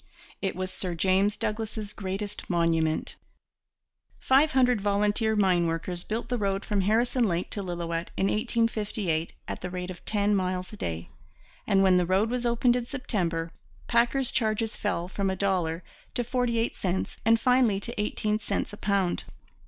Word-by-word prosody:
It 195 - -1
was 185 0 -3
Sir 180 -3 -3
James 190 +4 +2
Douglas's 215 -1 -3
greatest 195 +1 -5
monument. 165 -2 +1 1.0
Five 290 +4 +4
hundred 250 -4 +4
volunteer 210 +2 +2
mine 185 -4 +3
workers 165 +2 -2
built 225 +2 -3
the 245 -1 -1
road 195 -1 -1
from 205 -2 +1
Harrison 235 +4 +2
Lake 175 -1 -1
to 205 - -1
Lillooet 170 -2 -3
in 190 - +2
1858 210 -6 0
at - - -5
the 180 - -4
rate 180 0 -4
of 175 - -11
ten 205 -1 +1
miles 185 0 -2
a - - -6
day; 85 - -4 0.6
and 195 -1 +4
when 185 -1 +5
the 180 -1 +2
road 195 +5 +2
was 245 -1 0
opened 240 +1 +3
in 245 -1 -2
September, 175 - -2 0.4
packers' 240 +2 +2
charges 220 0 0
fell 175 -4 -2
from 195 +1 -1
a 190 - -1
dollar 180 -4 0 0.3
to 245 - +1
forty 245 -1 0
eight 230 +1 0
cents 185 0 -2
and 225 0 +4
finally 250 -6 +3
to 235 +1 -4
eighteen 210 0 -1
cents 210 - -2
a - - -7
pound. 200 -4 0
200 Hz, 170 wpm, -27 LUFS, 180-225 Hz, 1.0 s, when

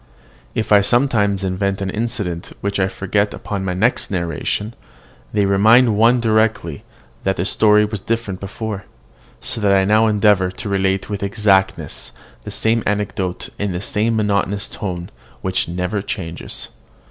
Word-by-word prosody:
If 110 - -2
I 105 -1 +7
sometimes 105 -4 +2
invent 95 +1 -1
an 95 -1 -2
incident 105 -6 -3
which 100 0 -1
I 95 - +3
forget 100 +2 -1
upon 100 -2 -4
the 90 -1 -1
next 115 +7 +1
narration, 95 +4 -2 0.6
they 105 -1 +2
remind 110 +4 +5
one 115 +4 +4
directly 110 -8 +1 0.4
that 95 0 +1
the 90 - -1
story 105 0 +4
was 105 -2 -5
different 110 -5 -2
before; 100 +1 -5 0.6
so 115 - -1
that 100 -1 +3
I 95 -1 +4
now 110 +2 +4
endeavour 105 -3 +3
to 95 - -7
relate 95 -1 0
with 100 -2 -4
exactness 100 -1 0 0.3
the - - -8
same 115 +1 +1
anecdote 100 -3 -2
in 100 -2 -1
the 90 - -2
same 110 +3 0
monotonous 100 -1 0
tone, 90 -3 -5 0.3
which 95 -1 0
never 90 +4 -2
changes. 85 -4 -5
100 Hz, 150 wpm, -19 LUFS, 95-110 Hz, 0.6 s, I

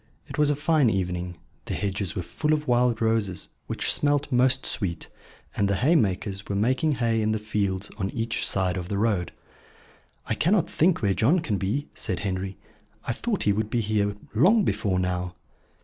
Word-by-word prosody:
It - - -7
was 150 -1 +4
a 145 - +2
fine 150 -3 +3
evening. 90 -3 -2 0.3
The - - -3
hedges 100 -2 -2
were 90 - -2
full 150 - -1
of 150 -1 -1
wild 120 -2 +2
roses, 110 -5 0 0.2
which - - +1
smelt 145 0 +1
most 130 +1 +3
sweet; 85 -6 -2 0.5
and 100 - +2
the 100 - +2
haymakers 105 - +1
were 100 - -1
making 130 +9 +2
hay 115 -3 +1
in 110 0 +1
the - - 0
fields 105 -2 -2
on 95 -1 -1
each 115 +1 -2
side 95 -1 0
of 90 -1 -5
the 100 - -1
road. 100 -5 0 0.9
"I - - -1
cannot 175 - +2
think 165 -4 +2
where 100 -1 +3
John 130 - +3
can 110 - -2
be," 110 +11 -1
said 95 -3 -3
Henry. 95 -1 -3 0.5
"I 120 - -1
thought 215 - -2
he 100 - +3
would 105 +1 -1
be 120 +1 0
here 105 -1 0 0.2
long 195 - +5
before 100 - 0
now." 90 -1 -2
110 Hz, 185 wpm, -26 LUFS, 95-130 Hz, 0.9 s, long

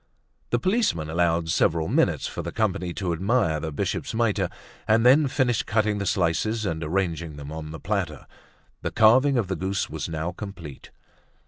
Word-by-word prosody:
The 120 - +2
policeman 155 - 0
allowed 85 -1 +1
several 80 -1 +2
minutes - - +1
for - - -4
the - - -5
company 90 0 -1
to 90 -4 -1
admire 90 -3 +1
the 80 0 -4
bishop's 70 - -3
mitre 105 -5 +1 0.4
and 115 +2 +3
then 140 +4 +6
finished 130 -4 0
cutting 105 -1 +1
the 100 - -2
slices 100 +6 0
and 80 -3 -2
arranging 85 -2 -2
them 70 0 -8
on 80 -1 -6
the 80 0 -7
platter. - - -3 0.6
The - - -2
carving 130 +5 +5
of 110 -6 0
the 95 - -2
goose 95 +3 -2
was - - -4
now 80 +2 -3
complete. 90 -7 -9
95 Hz, 175 wpm, -25 LUFS, 80-110 Hz, 0.6 s, then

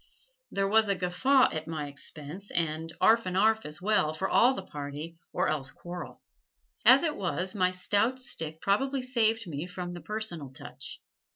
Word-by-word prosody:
There 195 0 0
was 220 +1 +4
a 200 - +2
guffaw 250 +10 +3
at 155 0 -4
my 155 -2 -3
expense 150 +6 -8
and 165 0 -1
'arf 225 -2 +4
and 185 0 -1
'arf 220 0 +3
as 150 +1 -8
well, 190 -7 +2
for 190 +4 -1
all 255 +3 +4
the 195 - -5
party, 150 +1 -7
or - - 0
else 135 -3 -1
quarrel. 175 +3 -9 0.6
As 255 +6 +8
it 310 -3 +1
was, 185 0 -1
my 185 -3 +2
stout 205 +7 +1
stick 160 - -2
probably 265 +7 +1
saved 230 -3 +1
me 160 0 -5
from 180 -1 -6
the 175 -1 -7
"personal 210 -10 -5
touch." 130 - -9
185 Hz, 175 wpm, -29 LUFS, 160-220 Hz, 0.6 s, As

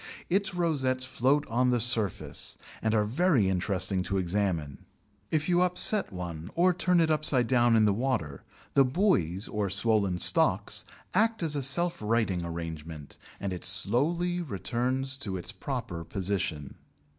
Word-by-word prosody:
Its 195 -1 0
rosettes 135 -7 0
float 135 +3 +1
on 125 +2 +1
the 125 -1 +2
surface, 110 -5 0 0.2
and 110 0 0
are 105 -1 +2
very 135 - +2
interesting 95 0 0
to 95 +1 -2
examine. 90 -6 -1 0.5
If 155 -1 0
you 175 0 +3
upset 180 +3 +2
one 85 -3 -6
or 180 +2 +3
turn 180 0 +2
it 160 -1 +2
upside 150 -5 +3
down 120 -1 +3
in 110 -1 +4
the 105 - +3
water, 100 - -2 0.3
the 140 - +5
"buoys" 125 - 0
or 105 -2 -2
swollen 100 -2 +1
stalks - - +2 0.3
act 220 0 +2
as 155 -2 0
a 145 - -1
self 165 +5 +2
righting 105 -5 0
arrangement, 80 -3 -7 0.2
and 100 -2 -3
it 90 - -7
slowly 150 - +1
returns 130 - -2
to 100 -8 -4
its 90 - -5
proper 120 - -5
position. 90 -5 -3
115 Hz, 150 wpm, -28 LUFS, 95-145 Hz, 0.5 s, the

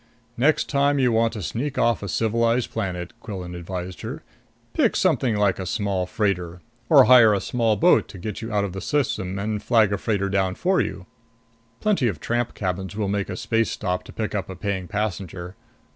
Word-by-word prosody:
"Next 145 +6 +2
time 140 0 +2
you 130 -3 +3
want 115 0 +2
to 105 -4 -5
sneak 120 - -3
off 120 -1 +2
a 100 - -4
civilized 115 +4 +1
planet," 90 -5 -4
Quillan 95 -5 -7
advised 90 +1 -6
her, - - -6 0.5
"pick - - +2
something 120 -5 +2
like 100 -3 +2
a 95 - -3
small 95 -1 -1
freighter. 90 -5 -1 0.3
Or 140 -4 +8
hire 120 -3 +7
a - - 0
small 115 0 +1
boat 175 +10 +4
to 100 - -11
get 105 +3 -5
you 110 0 -5
out 105 -1 +1
of 100 -3 -3
the 95 - -5
system 105 -10 -1
and 105 +1 -2
flag 110 -4 +3
down - - -2
a - - 0
freighter 100 -3 0
for 185 +1 +2
you. 95 -1 -4 0.8
Plenty 195 - +2
of 95 -9 -2
tramp 120 +5 -2
captains 95 0 -3
will 105 -2 -1
make 100 0 -1
a - - -4
space 115 -1 0
stop 90 0 -2
to - - -11
pick 110 -1 -4
up 100 -3 -3
a 95 - -6
paying 95 -1 -3
passenger. 95 -3 -4
105 Hz, 200 wpm, -23 LUFS, 95-115 Hz, 0.8 s, Or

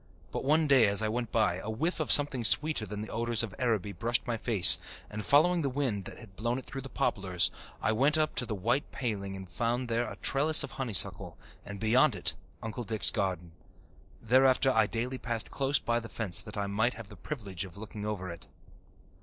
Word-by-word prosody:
But - - -5
one 155 +4 +2
day 135 -6 +5
as 100 +2 0
I 110 - -1
went 120 +1 -4
by, 110 -6 +1
a 100 +4 -7
whiff 160 +12 -2
of 155 - -1
something 145 -4 +6
sweeter 150 -1 +1
than 105 +1 -6
the 110 - -7
odours 115 0 +1
of 110 -4 -6
Araby 110 -6 -1
brushed 115 +6 -2
my 120 - -2
face 110 -5 +6 0.3
and, 105 0 -6
following 170 +7 +3
the 140 - -1
wind 125 -8 -3
that - - -10
had 110 -5 -15
blown 120 +4 -2
it 130 - -8
through 135 - -7
the 135 - -10
poplars, 95 -6 0 0.3
I - - +1
went 140 +8 +2
up 155 0 0
to 125 - -2
the 110 - -4
white 120 +9 -1
paling 100 -6 -4
and 95 -1 -9
found 120 +4 -3
there 115 0 -2
a - - -8
trellis 150 +3 +5
of - - -7
honeysuckle, 120 -8 +1 0.3
and 105 -1 -9
beyond 115 +4 +2
it - - -1 0.3
Uncle 115 +2 -6
Dick's 110 -1 0
garden. 90 -4 -3 0.7
Thereafter 130 +3 +3
I 110 -4 +2
daily 125 +4 -4
passed 115 -2 -1
close 140 +1 0
by 120 0 -1
the 115 -1 -10
fence 100 -7 +1
that 105 - -10
I 100 - -2
might 110 +5 -1
have 115 -3 -11
the 105 - -12
privilege 100 - -6
of 95 -1 -12
looking 105 0 -9
over 100 -4 -5
it. 85 - -11
115 Hz, 215 wpm, -29 LUFS, 105-130 Hz, 0.7 s, something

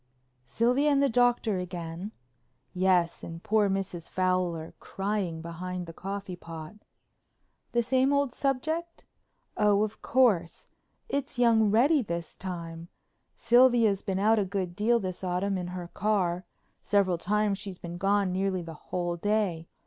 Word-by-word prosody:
"Sylvia 250 - +2
and 280 -1 +3
the 280 - +3
Doctor 240 -4 +2
again?" 175 +1 -6 0.6
"Yes, 180 -2 +2
and 165 0 -8
poor 215 -1 +2
Mrs. 190 -3 -3
Fowler 180 -3 -1
crying 195 -5 -3
behind 180 +2 -5
the 165 - -9
coffee 195 0 -5
pot." 165 -1 -9 1.0
"The 240 0 +2
same 260 +3 +2
old 280 -3 +1
subject?" 315 +6 -2 0.5
"Oh, 210 0 +4
of 215 0 -5
course. 205 -10 +2 0.4
It's 280 -2 -3
young 225 -3 +4
Reddy 270 +8 +4
this 170 -6 -5
time. 170 -3 -6 0.5
Sylvia's 235 -4 +4
been 190 -1 -2
out 215 +3 +3
a - - +2
good 185 -2 -3
deal 235 +4 +2
this 185 -2 -5
autumn 185 +2 0
in 180 -1 -3
her 180 -1 -6
car; 185 -4 0 0.4
several 190 -4 +2
times 205 +1 0
she's 195 -3 -7
been 175 0 -7
gone 200 0 +2
nearly 190 -1 -1
the 165 -1 -8 0.2
whole 175 -1 -2
day. 195 -4 0
195 Hz, 140 wpm, -28 LUFS, 175-220 Hz, 1.0 s, Oh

